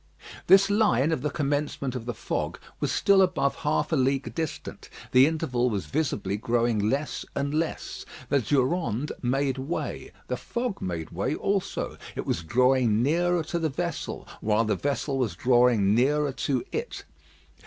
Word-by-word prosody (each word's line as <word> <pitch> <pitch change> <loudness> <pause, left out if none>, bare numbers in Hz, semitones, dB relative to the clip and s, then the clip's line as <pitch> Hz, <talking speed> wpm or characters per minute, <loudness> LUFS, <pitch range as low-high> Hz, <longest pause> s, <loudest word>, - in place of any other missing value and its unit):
This 195 +1 +6
line 165 - +3
of 160 - -1
the 150 - 0
commencement 145 -3 -1
of 125 -2 -6
the 120 - -3
fog - - -3 0.2
was - - -1
still 200 -1 +4
above 180 -7 +1
half 150 +1 0
a - - +3
league 135 0 0
distant. 160 -3 -5 0.2
The 130 +2 +7
interval 125 -6 0
was 100 -7 -2
visibly 100 - -1
growing 115 -1 +1
less 145 +4 -2
and 140 +1 -1
less. 160 +1 -3 0.3
The 140 - +3
Durande 140 - 0
made 135 +1 0
way; 140 +6 -4 0.2
the - - -2
fog 240 -3 -4
made 85 -4 -4
way 95 - -1
also. 195 -1 -2 0.2
It - - -4
was - - -1
drawing 120 +3 +3
nearer 175 +4 +2
to 170 +2 -3
the 160 -1 0
vessel, 170 +3 -4
while 110 +2 +2
the 105 -1 +1
vessel 140 +3 -1
was 115 -9 -1
drawing 120 -2 +4
nearer 145 +5 +2
to 135 -1 -1
it. 465 +2 -4
135 Hz, 160 wpm, -26 LUFS, 120-160 Hz, 0.3 s, The